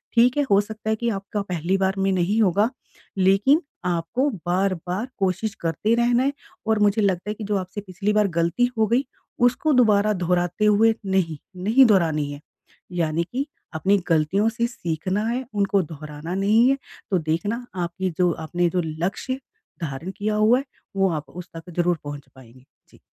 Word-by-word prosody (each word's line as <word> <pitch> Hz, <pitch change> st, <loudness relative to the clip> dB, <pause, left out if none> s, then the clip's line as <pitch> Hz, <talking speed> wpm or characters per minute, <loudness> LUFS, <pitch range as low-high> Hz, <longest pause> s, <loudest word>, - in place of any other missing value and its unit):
ठीक 245 Hz, +3 st, +5 dB
है 290 Hz, -, +3 dB
हो 200 Hz, -, +6 dB
सकता 220 Hz, +1 st, -6 dB
है 220 Hz, -, +2 dB
कि 235 Hz, +2 st, -1 dB
आपका 205 Hz, 0 st, -3 dB
पहली 180 Hz, -1 st, -1 dB
बार 190 Hz, 0 st, +1 dB
में 195 Hz, 0 st, +1 dB
नहीं 190 Hz, +4 st, +1 dB
होगा, 205 Hz, +2 st, +3 dB, 0.5 s
लेकिन 195 Hz, -, +4 dB, 0.2 s
आपको 180 Hz, -, 0 dB, 0.2 s
बार-बार 185 Hz, +3 st, -1 dB
कोशिश 195 Hz, +2 st, 0 dB
करते 170 Hz, +7 st, +1 dB
रहना 240 Hz, +1 st, +3 dB
है, 280 Hz, +1 st, +1 dB, 0.3 s
और 220 Hz, -1 st, +2 dB
मुझे 210 Hz, +1 st, +3 dB
लगता 190 Hz, -1 st, 0 dB
है -, -, -1 dB
कि 215 Hz, -, -7 dB
जो 205 Hz, 0 st, 0 dB
आपसे 185 Hz, +2 st, -5 dB
पिछली 200 Hz, +1 st, -2 dB
बार 210 Hz, -1 st, +3 dB
गलती 170 Hz, +9 st, +2 dB
हो 220 Hz, -1 st, +3 dB
गई 245 Hz, +6 st, +2 dB, 0.4 s
उसको 250 Hz, +5 st, +2 dB
दोबारा 215 Hz, -4 st, +4 dB
दोहराते 180 Hz, +1 st, 0 dB
हुए 215 Hz, +2 st, +5 dB
नहीं, 190 Hz, -5 st, 0 dB, 0.3 s
नहीं 235 Hz, +7 st, +6 dB
दोहरानी 160 Hz, -9 st, +2 dB
है, 145 Hz, 0 st, -8 dB, 0.5 s
यानी 165 Hz, -2 st, 0 dB
कि 270 Hz, +3 st, -1 dB, 0.3 s
अपनी 190 Hz, +6 st, +2 dB
गलतियों 165 Hz, +6 st, +2 dB
से 235 Hz, +1 st, -1 dB
सीखना 185 Hz, -1 st, -2 dB
है 250 Hz, +3 st, -2 dB
उनको 200 Hz, -1 st, +2 dB
दोहराना 155 Hz, 0 st, -7 dB
नहीं 215 Hz, +6 st, +4 dB
है। 275 Hz, -, +2 dB, 0.3 s
तो 190 Hz, -, +3 dB
देखना 190 Hz, +10 st, -2 dB, 0.2 s
आपने 175 Hz, +2 st, -2 dB
जो, 180 Hz, -1 st, +4 dB
आपने 175 Hz, +2 st, -1 dB
जो 180 Hz, +1 st, 0 dB
लक्ष्य 180 Hz, -, -3 dB, 0.4 s
धारण 155 Hz, +4 st, -4 dB
किया 210 Hz, +1 st, -1 dB
हुआ 215 Hz, +4 st, +4 dB
है 275 Hz, -, -6 dB, 0.3 s
वो 195 Hz, 0 st, +3 dB
आप 155 Hz, -2 st, -5 dB
उस 180 Hz, +1 st, -9 dB
तक 165 Hz, +2 st, -9 dB
ज़रूर 175 Hz, 0 st, +2 dB
पहुँच 145 Hz, -1 st, -7 dB
पाएँगे। 130 Hz, 0 st, -17 dB, 0.2 s
जी। -, -, -20 dB
195 Hz, 180 wpm, -23 LUFS, 170-220 Hz, 0.5 s, हो